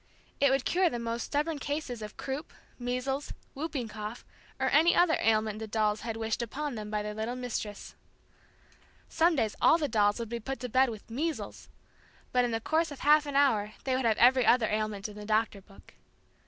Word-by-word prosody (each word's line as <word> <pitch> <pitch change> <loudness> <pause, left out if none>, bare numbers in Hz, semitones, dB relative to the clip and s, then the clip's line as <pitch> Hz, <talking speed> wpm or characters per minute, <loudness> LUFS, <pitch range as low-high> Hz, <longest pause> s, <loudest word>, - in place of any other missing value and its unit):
It 280 - +5
would 270 0 +1
cure 365 0 +3
the 240 - -4
most 235 0 -3
stubborn 300 +1 -1
case 290 +3 -3
of 210 -1 -8
croup, 275 +4 -5 0.3
measles, 255 +3 -2 0.2
whooping 275 -4 -3
cough 215 +2 -7 0.3
or - - +1
any 330 +3 +5
other 345 -2 +4
ailment 215 -1 +1
the 220 - -5
dolls 215 -1 0
had 225 -1 -4
wished 225 +1 -2
upon 280 +5 -4
them 215 -2 -6
by 210 0 -2
their 210 0 -4
little 220 +3 -3
Mistress. 230 -5 -5 1.2
Some 330 +1 +3
days 220 -7 0
all 325 - +6
the 305 -3 -1
dolls 205 -4 +2
would 235 -1 -4
be 235 +2 -4
put 270 +4 -5
to 250 - -4
bed 255 +2 +4
with 220 -3 -8
"measles" 310 +6 -4 0.6
but 250 0 +3
in 245 - 0
the 225 -1 -1
course 320 +7 +1
of 285 -2 -9
half 300 0 +5
an 285 - -4
hour 215 -7 +3
they 260 -1 0
would 260 -1 -1
have 220 -2 +3
every 255 +1 +6
other 240 -1 +4
ailment 215 -1 -2
in 210 - -11
the 210 - -8
Doctor 215 -1 0
book. 195 +1 -19
240 Hz, 205 wpm, -29 LUFS, 215-280 Hz, 1.2 s, all